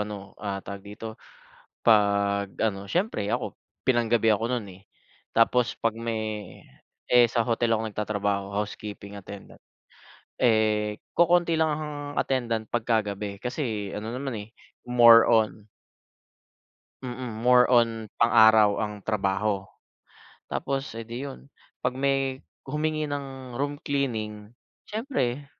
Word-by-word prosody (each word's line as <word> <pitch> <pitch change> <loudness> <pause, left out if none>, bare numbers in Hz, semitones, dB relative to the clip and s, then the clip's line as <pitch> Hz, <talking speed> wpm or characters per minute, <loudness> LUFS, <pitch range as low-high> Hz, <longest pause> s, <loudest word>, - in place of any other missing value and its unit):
ano, 105 -2 -6
ah, 100 -2 -4
tawag 100 0 -7
dito, 105 +3 -9 0.6
pag 100 -2 +3
ano 100 -3 0
siyempre 170 - -1
ako - - -2 0.2
pinanggabi 120 -2 +2
ako 110 +1 +3
no'n, 120 -4 -2
eh, 95 - -20 0.5
tapos 115 +1 +3
'pag 115 -1 0
may 110 -4 -4 0.5
eh, 125 -1 +7
sa 120 - +2
hotel 115 0 +1
ako 110 0 +1
nagtatrabaho, 100 -2 -2
housekeeping 100 0 -5
attendant, 100 0 -11 0.8
eh, 110 -3 +2 0.2
kokonti 170 -1 +3
lang 160 -1 +3
ang 150 -1 -5 0.2
attendant 115 -4 -1
pagkagabi 105 -4 -1
kasi 115 -6 -3
ano 110 +3 -5
naman, 135 0 -4
eh, - - -21 0.4
more 120 -2 +8
on 110 -2 +2 1.4
mm, 120 -3 -6
more 125 0 +6
on 115 -3 +2
pang-araw 110 -2 +6
ang 105 -1 -2
trabaho. 100 -1 0 0.8
Tapos, 135 +1 -2
eh, 115 - -5
di 120 +5 -6
'yun, 135 - -9 0.4
'pag 125 - +2
may 135 0 0 0.3
humingi 155 +2 -1
ng 135 -3 -6
room 145 +1 -1
cleaning 110 -8 -3 0.4
siyempre 175 - -2
115 Hz, 120 wpm, -26 LUFS, 105-130 Hz, 1.4 s, more